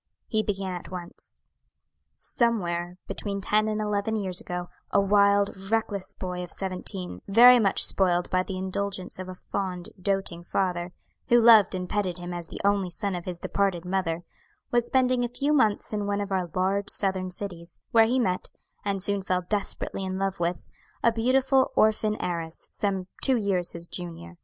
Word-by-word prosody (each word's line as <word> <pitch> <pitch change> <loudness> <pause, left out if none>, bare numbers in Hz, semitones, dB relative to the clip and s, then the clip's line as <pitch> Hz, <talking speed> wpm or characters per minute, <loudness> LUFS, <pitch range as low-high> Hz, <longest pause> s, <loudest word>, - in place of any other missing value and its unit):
He 220 -2 0
began 195 -3 -2
at 175 - -7
once. 180 -2 -8 0.7
"Somewhere 175 -7 -1
between 200 -1 -4
ten 215 +2 +2
and 215 0 -1
eleven 210 +1 -1
years 190 -4 -1
ago, 180 0 -4 0.2
a 200 - +3
wild, 200 0 +4
reckless 215 -3 -1
boy 180 -1 -4
of 180 - -7
seventeen, 185 - -4
very 245 +4 +8
much 195 -4 +2
spoiled 180 -2 +2
by 185 - +3
the 185 0 -5
indulgence 190 0 -2
of 185 0 -6
a 185 - -7
fond, 180 -1 -4
doting 195 -3 -1
father, 175 -1 -1 0.4
who 240 - +6
loved 225 -5 +7
and 180 0 -3
petted 185 -2 -1
him 175 0 -6
as 175 -1 -5
the - - -8
only 200 -2 +2
son 200 +3 -2
of 175 -1 -5
his 180 -2 -4
departed 190 -3 0
mother, 180 -2 -1 0.5
was 240 0 +2
spending 255 -1 +2
a - - +1
few 280 +5 0
months 220 -7 +2
in 205 -1 -1
one 200 0 0
of 200 0 -4
our 185 -2 0
large 195 +2 +1
Southern 190 -2 0
cities, 175 -2 -7
where 225 -1 +6
he 245 +3 +1
met, 185 -7 0 0.3
and 195 -2 -1
soon 200 -1 +1
fell 185 -1 -1
desperately 200 -1 -2
in 190 0 -3
love 195 -1 -1
with, 170 0 -2 0.4
a 235 - +5
beautiful 260 +3 +2
orphan 215 0 +2
heiress, 165 -2 -4
some 195 -3 -1 0.2
two 265 -2 +3
years 195 -5 0
his 170 0 -6
junior. 165 - -6
195 Hz, 175 wpm, -27 LUFS, 180-210 Hz, 0.7 s, very